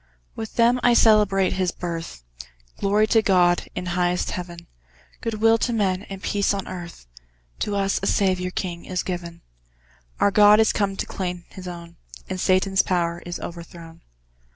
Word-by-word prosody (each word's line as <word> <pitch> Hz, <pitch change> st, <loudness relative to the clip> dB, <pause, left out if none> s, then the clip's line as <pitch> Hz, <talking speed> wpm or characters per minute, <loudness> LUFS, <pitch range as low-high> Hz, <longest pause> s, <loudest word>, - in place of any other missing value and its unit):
With 220 Hz, -1 st, -7 dB
them 240 Hz, +1 st, +4 dB
I 245 Hz, -1 st, +4 dB
celebrate 210 Hz, -4 st, +4 dB
His 185 Hz, -1 st, 0 dB
birth 165 Hz, -, -6 dB, 0.6 s
Glory 205 Hz, +2 st, +2 dB
to 220 Hz, +1 st, +3 dB
God, 180 Hz, -4 st, +3 dB
in 180 Hz, -, -4 dB
highest 180 Hz, 0 st, 0 dB
Heaven, 175 Hz, -1 st, -7 dB, 0.6 s
Good 225 Hz, -1 st, -3 dB
will 225 Hz, +1 st, +3 dB
to 240 Hz, -, 0 dB
men, 195 Hz, -3 st, -1 dB
and 195 Hz, 0 st, -8 dB
peace 200 Hz, 0 st, 0 dB
on 195 Hz, -, -5 dB
earth, 175 Hz, -, -8 dB, 0.5 s
To 205 Hz, -, -2 dB
us 195 Hz, 0 st, 0 dB
a 195 Hz, -, -2 dB
Saviour 185 Hz, -2 st, +1 dB
king 175 Hz, -2 st, -5 dB
is 180 Hz, -1 st, -3 dB
given; 170 Hz, -2 st, -6 dB, 0.8 s
Our 200 Hz, -, +3 dB
God 210 Hz, +1 st, +6 dB
is 220 Hz, -, +3 dB
come 200 Hz, -2 st, 0 dB
to -, -, -3 dB
claim 180 Hz, -2 st, -5 dB
His 185 Hz, -1 st, -10 dB
own, 170 Hz, -1 st, -9 dB, 0.3 s
And 185 Hz, -, -4 dB
Satan's 190 Hz, +1 st, +2 dB
power 170 Hz, -2 st, -1 dB
is 175 Hz, -, -5 dB
overthrown! 170 Hz, -1 st, -10 dB
185 Hz, 165 wpm, -23 LUFS, 175-205 Hz, 0.8 s, God